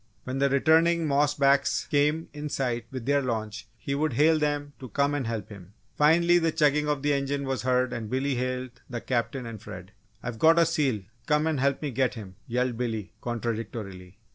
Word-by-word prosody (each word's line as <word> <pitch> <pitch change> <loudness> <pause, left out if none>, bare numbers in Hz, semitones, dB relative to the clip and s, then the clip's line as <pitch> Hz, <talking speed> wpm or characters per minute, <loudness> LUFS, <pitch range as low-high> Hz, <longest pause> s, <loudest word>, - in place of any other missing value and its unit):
When 130 +1 -4
the 140 0 +3
returning 160 +4 +3
"moss 145 0 +2
backs" 140 0 +2
came 150 +3 +2
in 150 0 -5
sight 120 -5 -2
with 130 -3 -6
their 140 +1 +2
launch 110 -4 -4
he 140 +6 -4
would 150 0 0
hail 155 +5 +4
them 145 -1 -1
to 130 -3 -8
come 140 +5 +1
and 140 -5 -2
help 115 -2 -4
him. 100 -2 -12 0.2
Finally, 170 +3 +5
the 165 -1 +1
chugging 150 -1 +2
of 145 -2 -1
the 145 0 +2
engine 140 0 -1
was 135 -1 -2
heard 125 0 +1
and 110 -2 -5
Billy 135 +3 0
hailed 125 -1 -3
the 120 -2 -4
Captain 120 +1 -2
and 115 -3 -7
Fred. 95 -3 -9 0.3
"I've 120 -2 -5
got 165 +1 +6
a 170 - +6
seal 140 - 0 0.2
come 150 0 +2
and 160 -4 0
help 140 +2 +1
me 145 - -2
get 130 +1 0
him!" 100 -5 -9
yelled 125 0 -1
Billy, 115 -4 -3
contradictorily. 110 -6 -5
135 Hz, 200 wpm, -27 LUFS, 115-150 Hz, 0.3 s, got